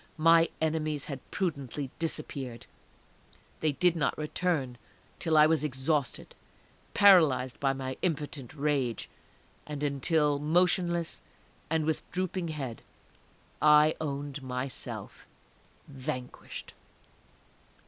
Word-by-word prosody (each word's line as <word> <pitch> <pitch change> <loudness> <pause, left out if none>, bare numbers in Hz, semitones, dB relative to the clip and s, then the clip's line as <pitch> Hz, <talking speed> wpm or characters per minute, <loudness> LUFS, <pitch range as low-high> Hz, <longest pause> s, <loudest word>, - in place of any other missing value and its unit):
My 165 +1 +5
enemies 155 -2 0
had 140 -3 -5
prudently 145 -7 -3
disappeared; 135 -6 -3 0.9
they 155 -2 +1
did 175 +4 +3
not 160 - 0
return 150 -5 -1 0.4
till 160 -2 +2
I 150 - +8
was 155 -2 +2
exhausted, 140 -1 -1 0.6
paralyzed 160 -11 +5
by 135 -1 +2
my 130 -1 -4
impotent 150 -5 -3
rage, 140 -6 0 0.6
and 150 -1 -5
until, 145 +1 +2
motionless, 170 +2 +1 0.5
and 160 -1 +1
with 160 0 0
drooping 185 0 -2
head, 135 -8 -5 0.8
I 150 +1 +6
owned 145 -1 -4
myself 130 0 -6 0.6
vanquished! 130 -2 -6
150 Hz, 95 wpm, -30 LUFS, 135-160 Hz, 0.9 s, I